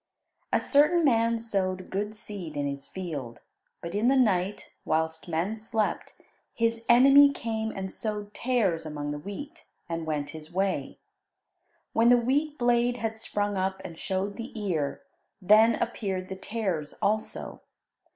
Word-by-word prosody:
A - - +3
certain 310 +4 +4
man 230 -3 +3
sowed 190 -5 -2
good 210 +3 -2
seed 185 -8 -7
in 145 - 0
his 140 0 -4
field, 150 -11 -6 0.4
but 170 - -5
in 210 +4 +1
the 270 - +5
night, 205 -6 +1
whilst 160 +1 -1
men 170 +6 -1
slept, 220 -1 -2 0.4
his 230 0 0
enemy 275 +4 +8
came 220 -4 -3
and 190 -3 -5
sowed 210 -1 -4
tares 225 -10 +1
among 145 -2 -4
the 145 - -4
wheat, 280 - -8 0.2
and 165 -1 -4
went 150 -2 -2
his 155 -1 -9
way. 190 +1 -1 1.0
When 230 +1 +4
the 245 - +7
wheat 285 +5 0
blade 240 0 +2
had 225 -2 -2
sprung 205 -2 -2
up 190 0 -1
and 170 -3 -7
showed 195 +4 -3
the 230 -1 -7
ear, 160 -9 -2 0.4
then 215 +4 +6
appeared 190 -5 -3
the 190 - -4
tares 190 -7 -3
also. 215 +1 -2
205 Hz, 150 wpm, -28 LUFS, 175-230 Hz, 1.0 s, enemy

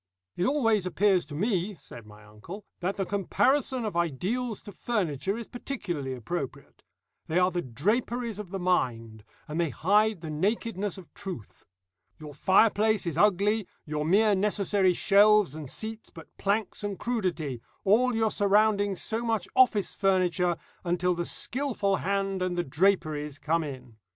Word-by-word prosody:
"It 180 - 0
always 225 -9 +2
appears 185 +1 +2
to 145 - -8
me," 200 +2 -1
said 120 -7 -13
my 105 0 -15
uncle, 110 - -10
"that 185 +2 -2
the 195 - -1
comparison 250 +6 +1
of 210 - -4
ideals 190 - -1
to 205 - -9
furniture 195 - -2
is 235 - -6
particularly 175 - -4
appropriate. 135 +4 -6 0.5
They 160 - 0
are 180 0 +4
the 175 0 -1
draperies 215 - -1
of 205 -4 -7
the 195 - -4
mind, 115 - -1 0.2
and 155 +2 -2
they 165 - 0
hide 205 - +2
the 160 -2 -6
nakedness 205 +3 -1
of 185 -4 -13
truth. 180 - -8 0.5
Your 150 -1 -10
fireplace 210 +6 +3
is 170 -4 -2
ugly, 205 +3 +2 0.2
your 150 0 -2
mere 205 +6 +4
necessary 195 -2 +2
shelves 205 -4 +5
and 155 -3 -7
seats 220 +5 -5
but 165 -3 -14
planks 205 0 -1
and 205 -2 -3
crudity, 175 - -2 0.2
all 240 +5 +3
your 225 -1 +1
surroundings 205 -1 +2
so 225 +1 -2
much 225 -5 -1
office 245 -6 +4
furniture, 180 -3 +1 0.3
until 180 +1 +1
the 175 0 -3
skilful 235 -7 0
hand 195 -1 -1
and 180 -1 -1
the 175 - +1
draperies 150 -2 0
come 165 +3 0
in. 125 -6 -9
190 Hz, 155 wpm, -28 LUFS, 160-210 Hz, 0.5 s, shelves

